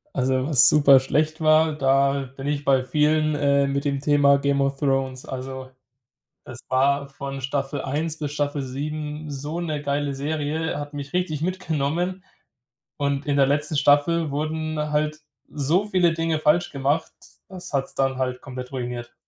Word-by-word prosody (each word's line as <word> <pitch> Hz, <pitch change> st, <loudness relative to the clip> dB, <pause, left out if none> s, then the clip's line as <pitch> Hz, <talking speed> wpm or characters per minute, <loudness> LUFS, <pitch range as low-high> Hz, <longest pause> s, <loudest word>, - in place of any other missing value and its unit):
Also, 130 Hz, +1 st, +1 dB
was 135 Hz, -6 st, +6 dB
super 140 Hz, -3 st, +6 dB
schlecht 155 Hz, +4 st, 0 dB
war, 155 Hz, 0 st, +4 dB
da 135 Hz, -1 st, +1 dB
bin 135 Hz, +1 st, -6 dB
ich 145 Hz, 0 st, -2 dB
bei 135 Hz, -2 st, +3 dB
vielen, 155 Hz, +2 st, +2 dB
äh, 140 Hz, -1 st, +2 dB
mit 140 Hz, +1 st, -2 dB
dem 140 Hz, -1 st, 0 dB
Thema 145 Hz, -1 st, +4 dB
Game 140 Hz, 0 st, +1 dB
of 135 Hz, 0 st, 0 dB
Thrones. 135 Hz, -2 st, -1 dB
Also 130 Hz, 0 st, -7 dB, 0.7 s
es 130 Hz, -2 st, -10 dB
war 140 Hz, +2 st, +2 dB
von 135 Hz, 0 st, -7 dB
Staffel 135 Hz, +1 st, -2 dB
1 155 Hz, +4 st, -3 dB
bis 145 Hz, -2 st, -4 dB
Staffel 145 Hz, -1 st, -1 dB
7 150 Hz, +3 st, -5 dB
so 145 Hz, +4 st, -5 dB
'ne 155 Hz, -3 st, -3 dB
geile 145 Hz, 0 st, -1 dB
Serie, 150 Hz, +2 st, -2 dB
hat 145 Hz, 0 st, -6 dB
mich 145 Hz, +2 st, -7 dB
richtig 170 Hz, -5 st, -1 dB
mitgenommen. 175 Hz, +1 st, -2 dB, 0.8 s
Und 140 Hz, 0 st, -1 dB
in 145 Hz, -1 st, +1 dB
der 135 Hz, -, +5 dB
letzten 150 Hz, +2 st, 0 dB
Staffel 145 Hz, +2 st, +3 dB
wurden 155 Hz, +1 st, -3 dB
halt 150 Hz, 0 st, 0 dB, 0.3 s
so 155 Hz, +8 st, 0 dB
viele 180 Hz, -4 st, +2 dB
Dinge 165 Hz, -1 st, 0 dB
falsch 155 Hz, +2 st, +2 dB
gemacht, 140 Hz, +4 st, -1 dB, 0.4 s
das 185 Hz, -3 st, -9 dB
hat's 135 Hz, -1 st, -1 dB
dann 135 Hz, -1 st, 0 dB
halt 125 Hz, -1 st, -2 dB
komplett 125 Hz, -1 st, -8 dB
ruiniert. 120 Hz, -2 st, -5 dB
145 Hz, 160 wpm, -23 LUFS, 135-155 Hz, 0.8 s, was